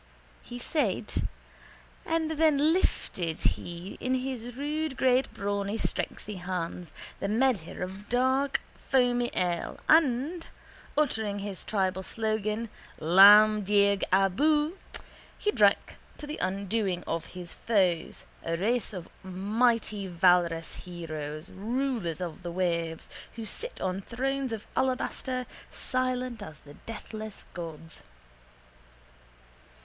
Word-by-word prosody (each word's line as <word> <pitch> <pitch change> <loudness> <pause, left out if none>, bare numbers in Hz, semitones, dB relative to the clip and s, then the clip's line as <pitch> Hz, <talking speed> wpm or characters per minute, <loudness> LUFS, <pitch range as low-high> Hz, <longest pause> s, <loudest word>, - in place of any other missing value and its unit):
_ - - -29 0.4
He 245 - -8
said 235 - -1 0.8
and 325 -1 +1
then 310 -1 +4
lifted 175 - 0
he 175 +2 -2
in 255 +1 0
his 250 -2 -4
rude 300 0 -2
great 260 0 +3
brawny 200 +1 -2
strengthy 210 -2 -3
hands 175 -2 -4 0.3
the - - -1
medher 215 -6 +1
of 190 +3 -7
dark 260 +3 +2
strong 265 -2 +2
foamy 245 0 0
ale 175 -2 -1
and, 315 +2 +3 0.5
uttering 220 -9 +1
his 200 -1 -5
tribal 190 -3 0
slogan 215 +2 -2 0.3
Lamh 205 +5 +8
Dearg 200 0 +3
Abu, 295 - +3 0.6
he 420 - +1
drank 205 - +3 0.2
to 300 - -7
the 300 +1 -6
undoing 195 -1 -1
of 165 0 -2
his 175 -2 -5
foes, 185 -7 +1 0.2
a 165 0 -1
race 225 +5 0
of 180 -3 -6
mighty 210 +2 +1
valorous 175 -2 +2
heroes, 155 -2 -6
rulers 225 - -2
of 175 0 -5
the 175 -1 -5
waves, 170 -2 -1 0.3
who 225 -1 -5
sit 480 - -5
on 185 +1 -1
thrones 265 +4 -2
of 220 -2 -4
alabaster 255 0 -1 0.2
silent 255 -2 -2
as 155 -7 -9
the 145 - -13
deathless 220 -1 -7
gods. 165 -1 -7
210 Hz, 115 wpm, -29 LUFS, 180-255 Hz, 0.8 s, Lamh